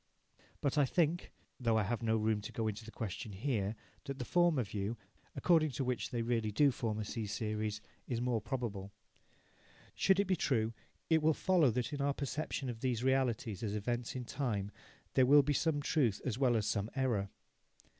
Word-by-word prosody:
But 145 Hz, +1 st, +1 dB
I 145 Hz, -, +5 dB
think 170 Hz, +4 st, +1 dB, 0.3 s
though 115 Hz, -3 st, +2 dB
I 110 Hz, -, +3 dB
have 110 Hz, +3 st, -2 dB
no 110 Hz, -1 st, +2 dB
room 110 Hz, -1 st, +1 dB
to -, -, -7 dB
go 110 Hz, -1 st, -2 dB
into 105 Hz, +1 st, -3 dB
the 110 Hz, -, -10 dB
question 110 Hz, -1 st, -5 dB
here 105 Hz, -1 st, -1 dB, 0.3 s
that 140 Hz, -1 st, -4 dB
the 125 Hz, -, -4 dB
former 175 Hz, -5 st, +3 dB
view, 105 Hz, +2 st, -3 dB, 0.4 s
according 160 Hz, -3 st, +4 dB
to 135 Hz, -, -1 dB
which 125 Hz, -1 st, -1 dB
they 120 Hz, -1 st, -2 dB
really 115 Hz, -2 st, 0 dB
do 140 Hz, +6 st, +4 dB
form 115 Hz, -3 st, -2 dB
a 110 Hz, -, -3 dB
C 110 Hz, 0 st, -4 dB
series, 105 Hz, 0 st, -2 dB, 0.3 s
is 120 Hz, -, -1 dB
the 120 Hz, -, -1 dB
more 120 Hz, -3 st, +1 dB
probable. 105 Hz, -6 st, -4 dB, 1.0 s
Should 190 Hz, 0 st, +3 dB
it 200 Hz, -, +3 dB
be 185 Hz, -1 st, +2 dB
true, 115 Hz, -8 st, +1 dB, 0.4 s
it 160 Hz, -1 st, +5 dB
will 155 Hz, 0 st, +3 dB
follow 180 Hz, -7 st, +4 dB
that 125 Hz, +4 st, -1 dB
in 145 Hz, -, -2 dB
our 140 Hz, 0 st, +1 dB
perception 140 Hz, 0 st, -3 dB
of 120 Hz, -2 st, -4 dB
these 125 Hz, -2 st, -1 dB
realities 125 Hz, -6 st, +1 dB
as 105 Hz, -2 st, -2 dB
events 120 Hz, +4 st, -2 dB
in 125 Hz, -1 st, -4 dB
time, 110 Hz, -7 st, -2 dB, 0.4 s
there 130 Hz, -1 st, +5 dB
will 145 Hz, +1 st, +8 dB
be 145 Hz, +2 st, +1 dB
some 145 Hz, 0 st, +1 dB
truth 125 Hz, -10 st, +2 dB
as 125 Hz, -, 0 dB
well 125 Hz, -2 st, +3 dB
as 105 Hz, -, 0 dB
some 105 Hz, 0 st, -1 dB
error. 120 Hz, -8 st, 0 dB
120 Hz, 200 wpm, -34 LUFS, 110-140 Hz, 1.0 s, will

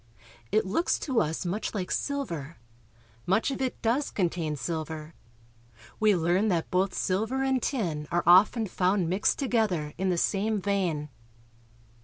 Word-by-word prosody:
It 215 Hz, -, +2 dB
looks 220 Hz, -, +1 dB
to 255 Hz, -6 st, +1 dB
us 160 Hz, +2 st, -2 dB
much 200 Hz, +5 st, -3 dB
like 185 Hz, -3 st, -3 dB
silver. 170 Hz, -, -3 dB, 0.7 s
Much 195 Hz, +9 st, +2 dB
of 270 Hz, -, -4 dB
it 260 Hz, -1 st, -2 dB
does 250 Hz, +5 st, +1 dB
contain 170 Hz, -5 st, -1 dB
silver. 160 Hz, 0 st, -5 dB, 0.9 s
We 215 Hz, -2 st, +4 dB
learn 175 Hz, +5 st, +2 dB
that 170 Hz, -5 st, 0 dB
both 185 Hz, +1 st, +1 dB
silver 220 Hz, +8 st, 0 dB
and 265 Hz, -1 st, +1 dB
tin 165 Hz, -, -2 dB
are 175 Hz, 0 st, +1 dB
often 205 Hz, +6 st, +6 dB
found 185 Hz, -2 st, +1 dB
mixed 190 Hz, +3 st, +2 dB
to 275 Hz, -, -2 dB
gether 185 Hz, -11 st, 0 dB
in 190 Hz, 0 st, +1 dB
the 180 Hz, -, +1 dB
same 210 Hz, +4 st, +1 dB
vein. 180 Hz, -7 st, -1 dB
190 Hz, 150 wpm, -28 LUFS, 170-220 Hz, 0.9 s, often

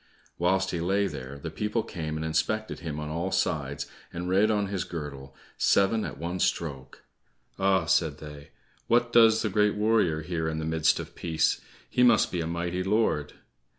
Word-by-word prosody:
Whilst 95 Hz, +2 st, +2 dB
he 85 Hz, -, -2 dB
lay 95 Hz, +4 st, +1 dB
there, 65 Hz, -6 st, -6 dB
the 80 Hz, +3 st, -6 dB
people 105 Hz, +6 st, -1 dB
came 80 Hz, -7 st, -5 dB
and 80 Hz, -, -3 dB
inspected 110 Hz, +8 st, -1 dB
him 80 Hz, -3 st, -5 dB
on 75 Hz, 0 st, -5 dB
all 85 Hz, +4 st, -2 dB
sides, 70 Hz, -7 st, -1 dB, 0.3 s
and 85 Hz, +1 st, -5 dB
read 100 Hz, +4 st, +3 dB
on 105 Hz, -2 st, +1 dB
his 95 Hz, -2 st, -2 dB
girdle, 70 Hz, -5 st, -7 dB, 0.2 s
"Seven 105 Hz, +3 st, +3 dB
at 70 Hz, -6 st, -6 dB
one 85 Hz, +4 st, -4 dB
stroke." 80 Hz, -7 st, -2 dB, 0.6 s
"Ah," 95 Hz, -1 st, +3 dB
said 80 Hz, -4 st, +2 dB
they, 75 Hz, -1 st, -10 dB, 0.4 s
"What 120 Hz, 0 st, +2 dB
does 110 Hz, -1 st, +6 dB
the 110 Hz, -, 0 dB
great 105 Hz, +1 st, +2 dB
warrior 105 Hz, -7 st, +2 dB
here 80 Hz, -1 st, -2 dB
in 80 Hz, 0 st, -2 dB
the 80 Hz, -, -3 dB
midst 80 Hz, -1 st, +2 dB
of -, -, -7 dB
peace? 80 Hz, -2 st, 0 dB, 0.3 s
He -, -, 0 dB
must 120 Hz, -3 st, +5 dB
be 90 Hz, -, -1 dB
a 80 Hz, -, -3 dB
mighty 85 Hz, +2 st, -2 dB
lord." 95 Hz, -7 st, +1 dB
85 Hz, 185 wpm, -27 LUFS, 80-100 Hz, 0.6 s, does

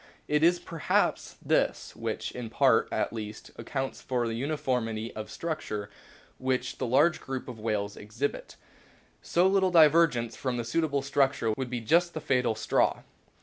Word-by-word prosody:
It 150 Hz, 0 st, +2 dB
is 175 Hz, +2 st, +5 dB
perhaps 165 Hz, -2 st, -1 dB
this -, -, 0 dB
which, -, -, -3 dB
in 120 Hz, -2 st, -6 dB
part -, -, +3 dB
at -, -, -1 dB
least, 110 Hz, -1 st, -7 dB
accounts 135 Hz, -1 st, -4 dB
for 125 Hz, -2 st, -1 dB
the 115 Hz, -, -2 dB
uniformity 125 Hz, -4 st, -2 dB
of 110 Hz, 0 st, -6 dB
structure 110 Hz, -11 st, -4 dB, 0.5 s
which 130 Hz, 0 st, -1 dB
the 130 Hz, -, -1 dB
large 145 Hz, +8 st, +3 dB
group 135 Hz, -1 st, -5 dB
of 120 Hz, -3 st, -8 dB
whales 105 Hz, -2 st, -2 dB
exhibits. 110 Hz, +7 st, -4 dB, 0.6 s
So 175 Hz, +2 st, +2 dB
little 190 Hz, 0 st, +3 dB
divergence 155 Hz, -8 st, +4 dB
from 130 Hz, -2 st, -2 dB
the 120 Hz, -, -3 dB
suit 160 Hz, +8 st, +1 dB
able 140 Hz, -3 st, -1 dB
structure 135 Hz, -4 st, +1 dB
would 125 Hz, +3 st, -3 dB
be 120 Hz, -1 st, -3 dB
just 170 Hz, +9 st, +2 dB
the -, -, -2 dB
fatal 125 Hz, -6 st, +1 dB
straw. -, -, +1 dB
130 Hz, 160 wpm, -28 LUFS, 115-155 Hz, 0.6 s, is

